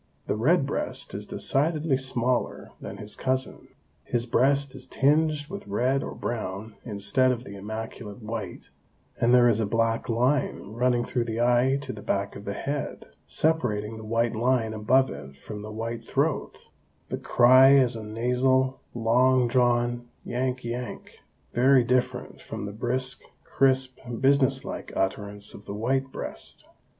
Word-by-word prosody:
The -, -, -1 dB
red 135 Hz, +7 st, +3 dB
breast 140 Hz, -, -3 dB
is -, -, -6 dB
decidedly 150 Hz, +1 st, 0 dB
smaller 130 Hz, -2 st, -1 dB
than -, -, -7 dB
his 105 Hz, 0 st, -4 dB
cousin, 130 Hz, 0 st, -2 dB, 0.4 s
his 120 Hz, -1 st, 0 dB
breast 140 Hz, +3 st, +2 dB
is 130 Hz, -1 st, -10 dB
tinged 150 Hz, +2 st, +2 dB
with 200 Hz, -, -8 dB
red 125 Hz, +7 st, +1 dB
or -, -, -6 dB
brown 110 Hz, -2 st, -4 dB
instead 110 Hz, +4 st, +1 dB
of 120 Hz, -1 st, -3 dB
the 100 Hz, -, -9 dB
immaculate 110 Hz, +1 st, -7 dB
white, 105 Hz, -4 st, -6 dB, 0.5 s
and 120 Hz, -, +3 dB
there 125 Hz, -1 st, +7 dB
is 115 Hz, -2 st, +3 dB
a 110 Hz, -, 0 dB
black 115 Hz, +2 st, 0 dB
line 125 Hz, -2 st, 0 dB
running 120 Hz, 0 st, +1 dB
through 120 Hz, -3 st, -1 dB
the 115 Hz, 0 st, -3 dB
eye 125 Hz, +3 st, +3 dB
to 135 Hz, -2 st, -5 dB
the 105 Hz, -, -9 dB
back 100 Hz, 0 st, -2 dB
of 100 Hz, -, -9 dB
the 100 Hz, -, -3 dB
head, 145 Hz, 0 st, -4 dB, 0.2 s
separating 110 Hz, -9 st, 0 dB
the 110 Hz, -, -9 dB
white 115 Hz, +1 st, 0 dB
line 115 Hz, -1 st, +1 dB
above 130 Hz, +5 st, +3 dB
it 70 Hz, 0 st, -9 dB
from 105 Hz, +7 st, -8 dB
the 105 Hz, +1 st, -7 dB
white 115 Hz, +2 st, -4 dB
throat; -, -, -2 dB, 0.4 s
the -, -, -2 dB
cry 130 Hz, +2 st, +6 dB
is 130 Hz, -3 st, +4 dB
a 110 Hz, -, -6 dB
nasal, 125 Hz, +4 st, +1 dB, 0.2 s
long 125 Hz, +2 st, +3 dB
drawn 120 Hz, -1 st, +1 dB, 0.2 s
'yank, 125 Hz, +1 st, -2 dB
yank,' 120 Hz, +1 st, -6 dB, 0.3 s
very 130 Hz, +1 st, +5 dB
different 125 Hz, +1 st, -1 dB
from -, -, -6 dB
the 100 Hz, -, -6 dB
brisk, 125 Hz, +3 st, -1 dB, 0.2 s
crisp, 130 Hz, -1 st, +1 dB, 0.2 s
business 135 Hz, 0 st, +3 dB
like -, -, -6 dB
utterance 100 Hz, +1 st, -3 dB
of 105 Hz, -, -12 dB
the 100 Hz, -, -6 dB
white 130 Hz, +5 st, 0 dB
breast. -, -, -7 dB
120 Hz, 155 wpm, -26 LUFS, 110-130 Hz, 0.5 s, there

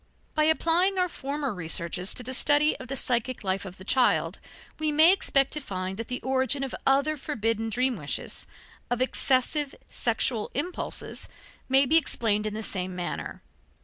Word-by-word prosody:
By 305 Hz, -1 st, +2 dB
applying 335 Hz, +4 st, +3 dB
our 365 Hz, 0 st, +2 dB
former 280 Hz, -5 st, -4 dB
researches 170 Hz, +1 st, -2 dB
to 250 Hz, -, -2 dB
the 260 Hz, +2 st, -5 dB
study 295 Hz, +3 st, +4 dB
of 260 Hz, -, -9 dB
the 270 Hz, -, -3 dB
psychic 250 Hz, -1 st, -1 dB
life 195 Hz, +1 st, -1 dB
of 190 Hz, 0 st, -9 dB
the 185 Hz, -, -10 dB
child, 255 Hz, +5 st, +2 dB, 0.4 s
we 310 Hz, -1 st, +1 dB
may 315 Hz, +4 st, +7 dB
expect 275 Hz, -8 st, +2 dB
to 300 Hz, -, +1 dB
find 190 Hz, -5 st, -5 dB
that 230 Hz, -, -5 dB
the 250 Hz, -, -3 dB
origin 265 Hz, +1 st, 0 dB
of 270 Hz, -, -4 dB
other 280 Hz, +3 st, +3 dB
forbidden 225 Hz, -6 st, -2 dB
dream 250 Hz, +1 st, +1 dB
wishes, 145 Hz, -4 st, -4 dB, 0.4 s
of 245 Hz, -, 0 dB
excessive 265 Hz, +2 st, +1 dB
sexual 230 Hz, -1 st, -1 dB
impulses, 345 Hz, +7 st, -4 dB, 0.4 s
may 270 Hz, +1 st, +5 dB
be 315 Hz, +5 st, +5 dB
explained 215 Hz, -8 st, +1 dB
in 210 Hz, -, -4 dB
the 220 Hz, -, -4 dB
same 185 Hz, -2 st, -3 dB
manner. 180 Hz, -1 st, -5 dB
255 Hz, 170 wpm, -27 LUFS, 215-290 Hz, 0.4 s, may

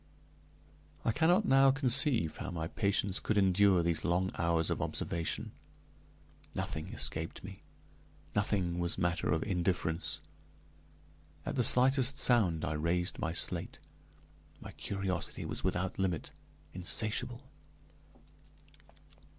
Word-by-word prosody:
I 115 Hz, -, +2 dB
cannot 175 Hz, -, +2 dB
now 135 Hz, -2 st, +5 dB
conceive 130 Hz, -, +4 dB
how 95 Hz, -, -5 dB
my 80 Hz, -3 st, -4 dB
patience 100 Hz, +1 st, 0 dB
could 110 Hz, -, -1 dB
endure 95 Hz, -2 st, +4 dB
those 85 Hz, -1 st, -1 dB
long 90 Hz, +2 st, 0 dB
hours 85 Hz, -1 st, +1 dB
of -, -, -2 dB
observation: 85 Hz, -1 st, -2 dB, 1.0 s
nothing 80 Hz, 0 st, -4 dB
escaped 80 Hz, +1 st, -3 dB
me; 95 Hz, 0 st, -10 dB, 0.8 s
nothing 95 Hz, -4 st, 0 dB
was 85 Hz, 0 st, 0 dB
matter 85 Hz, -2 st, -1 dB
of 80 Hz, +1 st, 0 dB
indifference. 90 Hz, -3 st, -2 dB, 1.3 s
At -, -, -3 dB
the 125 Hz, -, +1 dB
slightest 130 Hz, +2 st, +6 dB
sound 100 Hz, -13 st, +2 dB
I 75 Hz, -, -2 dB
raised 85 Hz, +4 st, -1 dB
my 80 Hz, -, -2 dB
slate; 85 Hz, -, -3 dB, 0.8 s
my -, -, -10 dB
curiosity 95 Hz, -3 st, -3 dB
was -, -, -5 dB
without 95 Hz, +2 st, -2 dB
limit, 90 Hz, -5 st, -2 dB, 0.4 s
insatiable. 110 Hz, +7 st, -3 dB
95 Hz, 110 wpm, -32 LUFS, 85-110 Hz, 1.3 s, slightest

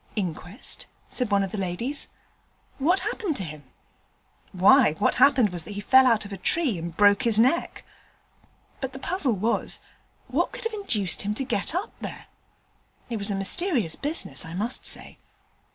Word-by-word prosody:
'Inquest?' 185 Hz, -, -6 dB, 0.2 s
said 250 Hz, -4 st, -2 dB
one 200 Hz, -1 st, +3 dB
of 195 Hz, -, -4 dB
the 210 Hz, -, -4 dB
ladies. 195 Hz, +10 st, -1 dB, 0.7 s
'What 350 Hz, +8 st, +2 dB
has -, -, -1 dB
happened 370 Hz, -9 st, -3 dB
to 195 Hz, -, -2 dB
him?' 155 Hz, -4 st, -9 dB, 0.9 s
'Why, 200 Hz, -, +5 dB
what -, -, +1 dB
happened 255 Hz, -8 st, +5 dB
was 175 Hz, -2 st, -2 dB
that 205 Hz, -, -8 dB
he -, -, -4 dB
fell 260 Hz, +5 st, +5 dB
out 230 Hz, -4 st, +2 dB
of 200 Hz, -, -8 dB
a -, -, -5 dB
tree 260 Hz, -, +1 dB
and 170 Hz, 0 st, -7 dB
broke 205 Hz, +2 st, +5 dB
his 230 Hz, -4 st, +2 dB
neck. 255 Hz, +9 st, +1 dB, 1.0 s
But 265 Hz, -1 st, -4 dB
the -, -, -7 dB
puzzle 300 Hz, -2 st, 0 dB
was, 215 Hz, +5 st, -1 dB, 0.5 s
what -, -, -1 dB
could -, -, -7 dB
have 455 Hz, 0 st, -3 dB
induced 220 Hz, -, -1 dB
him 205 Hz, +1 st, -2 dB
to 270 Hz, -, -2 dB
get 240 Hz, +3 st, -1 dB
up 390 Hz, +5 st, -2 dB
there. -, -, -7 dB, 0.9 s
It 230 Hz, -, -1 dB
was 200 Hz, 0 st, -2 dB
a 200 Hz, -, -1 dB
mysterious 230 Hz, -, +1 dB
business, 300 Hz, -, 0 dB
I 165 Hz, -1 st, -8 dB
must 220 Hz, +7 st, -1 dB
say. -, -, -1 dB
220 Hz, 180 wpm, -25 LUFS, 195-275 Hz, 1.0 s, Why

